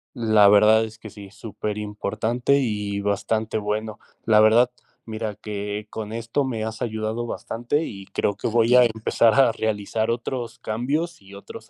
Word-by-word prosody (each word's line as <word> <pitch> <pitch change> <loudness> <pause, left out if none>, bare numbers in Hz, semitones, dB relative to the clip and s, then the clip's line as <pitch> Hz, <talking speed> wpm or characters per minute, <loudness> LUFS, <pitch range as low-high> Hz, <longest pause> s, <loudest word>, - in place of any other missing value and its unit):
La 110 -3 +4
verdad 105 +2 +6
es 110 0 -11
que 110 -2 -11
sí, 100 -2 -11
superimportante 105 +5 -2
y 105 -5 -2
bastante 110 +2 -1
bueno, 105 +1 -3 0.3
la 110 -1 +5
verdad, 115 +3 +5 0.3
mira 110 -2 -5
que 105 0 -5
con 110 -1 -6
esto 115 +5 -1
me 115 -5 -3
has 110 0 -6
ayudado 110 +1 -3
bastante 120 +8 -2
y 100 -7 -8
creo 100 - -1
que - - -3
voy 115 +1 +2
a 125 -1 +7
empezar 110 +1 +2
a 135 -3 +5
realizar 110 0 -2
otros 120 +1 -3
cambios 140 +8 -3
y 100 +1 -14
otros 100 - -11
110 Hz, 160 wpm, -23 LUFS, 105-115 Hz, 0.3 s, a